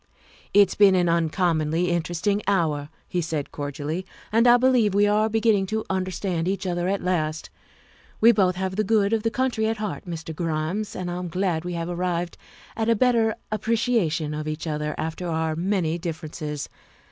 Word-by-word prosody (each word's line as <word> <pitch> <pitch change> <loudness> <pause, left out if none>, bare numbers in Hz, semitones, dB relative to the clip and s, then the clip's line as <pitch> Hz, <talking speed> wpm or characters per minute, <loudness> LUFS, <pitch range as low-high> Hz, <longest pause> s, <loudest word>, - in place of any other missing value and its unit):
" - - -26
It's 200 -2 +6
been 200 -2 +5
an 180 -1 +3
uncommonly 165 0 +1
interesting 175 +4 0
hour," 155 -7 +1 0.2
he 180 - -1
said 155 -3 -3
cordially, 145 +4 -4 0.2
" - - -23
and 230 +3 +4
I 240 0 +8
believe 245 -5 +3
we 205 0 +5
are 210 +1 +2
beginning 220 -3 +2
to 220 +2 -2
under 185 -1 -1
stand 180 -2 -2
each 195 +1 -2
other 175 -1 -1
at 200 +1 -1
last. 160 -3 -1 0.7
We 230 +2 +7
both 190 -5 +2
have 190 +1 -3
the 215 - +2
good 210 0 +2
of 225 - +2
the 225 - +1
country 240 -3 0
at 225 0 -1
heart, 210 -3 -4
Mr. 160 -2 -6
Grimes, 165 +5 -2
and 180 -1 -4
I'm 180 0 -4
glad 175 -1 -1
we 180 0 -4
have 170 -1 -3
arrived 175 -1 -2 0.4
at 225 0 0
a 230 - +5
better 230 -1 +3 0.2
appreciation 215 -8 0
of 155 0 -4
each 155 +2 -4
other 150 -1 -2
after 160 +3 -3
our 160 -1 -1
many 175 -1 0
differences. 155 -3 -5
180 Hz, 185 wpm, -24 LUFS, 160-210 Hz, 0.7 s, I